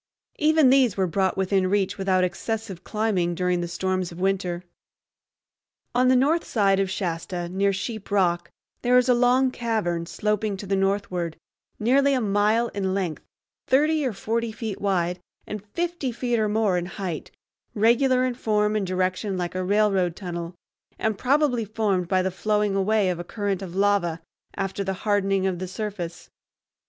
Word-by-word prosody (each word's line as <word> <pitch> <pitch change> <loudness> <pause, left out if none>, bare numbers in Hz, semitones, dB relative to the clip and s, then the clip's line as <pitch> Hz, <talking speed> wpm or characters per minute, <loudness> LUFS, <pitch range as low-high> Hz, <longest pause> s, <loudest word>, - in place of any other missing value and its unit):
Even 310 -3 +5
these 260 -7 +4
were 190 - +2
brought 190 +1 0
within 190 -1 +1
reach 200 0 0
without 190 -1 +2
excessive 215 +1 -3
climbing 200 -6 0
during 180 0 0
the 175 - -2
storms 185 +1 -2
of 170 - -10
winter. 185 -2 -1 1.3
On 250 +1 +3
the 255 - +5
north 295 +7 +3
side 195 -3 +2
of 195 -1 +1
Shasta, 175 -1 -3
near 195 +2 +1
Sheep 215 +2 -5
Rock, 175 -4 +1 0.3
there 250 0 +4
is 250 0 +4
a 250 - +5
long 250 +2 +3
cavern, 210 -9 -1
sloping 210 +2 -1
to 200 - -7
the 195 0 0
northward, 195 -4 -1 0.4
nearly 275 +5 +3
a - - +1
mile 215 +2 +2
in 190 -2 -2
length, 180 -5 -2 0.4
thirty 305 +3 +3
or 260 - 0
forty 225 +3 -2
feet 220 -2 -5
wide, 180 -3 0 0.3
and 210 -2 -6
fifty 335 +4 -3
feet 240 0 -1
or 215 -1 +1
more 210 -4 +2
in 175 - -5
height, 180 -5 -5 0.5
regular 250 +4 +3
in 255 - 0
form 210 -3 +1
and 205 -3 0
direction 185 +2 -1
like 175 -1 -3
a 185 0 -2
railroad 195 -3 +2
tunnel, 175 -2 -6 0.4
and 220 -2 -1
probably 270 -3 +2
formed 205 -4 -1
by 185 0 +2
the 190 - -1
flowing 210 +2 0
away 195 0 +2
of 175 - -4
a - - -4
current 200 0 -2
of 180 -2 -7
lava 195 -4 +2 0.4
after 195 0 -2
the 190 0 -2
hardening 195 -2 +2
of 185 -2 -1
the 185 - -4
surface. 185 -3 -5
200 Hz, 170 wpm, -25 LUFS, 185-225 Hz, 1.3 s, Even